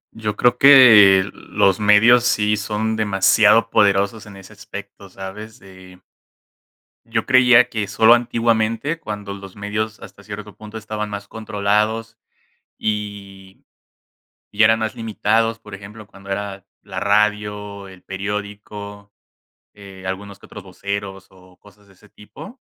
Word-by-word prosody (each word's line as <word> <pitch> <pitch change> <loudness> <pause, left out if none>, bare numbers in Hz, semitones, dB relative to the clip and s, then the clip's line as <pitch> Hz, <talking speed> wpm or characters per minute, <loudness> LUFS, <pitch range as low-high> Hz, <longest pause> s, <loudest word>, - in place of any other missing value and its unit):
Yo 105 -2 -4
creo 125 +2 +1
que 110 -9 +7
los 95 +1 0
medios 110 +4 +5
sí 105 -3 +1
son 110 +1 -3
demasiado 105 +2 +3
poderosos 100 +1 +1
en 100 - -12
ese 95 -1 -14
aspecto, 100 - -11
¿sabes?, 105 +5 -10
eh 95 -1 -16 1.0
Yo 115 -1 -3
creía 125 -1 +5
que 105 -2 -3
solo 110 +2 +5
antiguamente, 115 +3 0
cuando 105 -8 -7
los 100 -1 -12
medios, 105 +2 -4
hasta - - -14
cierto 105 -1 -9
punto, 110 0 -10
estaban 105 -1 -5
más 100 0 -7
controlados 110 +1 -2 0.6
y 100 -2 -6 0.8
y 105 +2 +1
eran 110 +1 +4
más 110 0 -3
limitados, 115 0 -1
por 105 -2 -11
ejemplo, 105 +2 -13
cuando 100 -1 -16
era 100 -1 -5 0.2
la - - -7
radio, 105 -1 -1
el 95 -1 -15
periódico, 100 +1 -7 0.6
eh, 100 -2 -14
algunos 95 +1 -6
que - - -16
otros 100 - -12
voceros 95 0 -6
o 90 -1 -21
cosas 105 0 -22
de 100 - -21
ese 105 +2 -23
tipo. 110 - -13
105 Hz, 135 wpm, -19 LUFS, 100-110 Hz, 1.0 s, que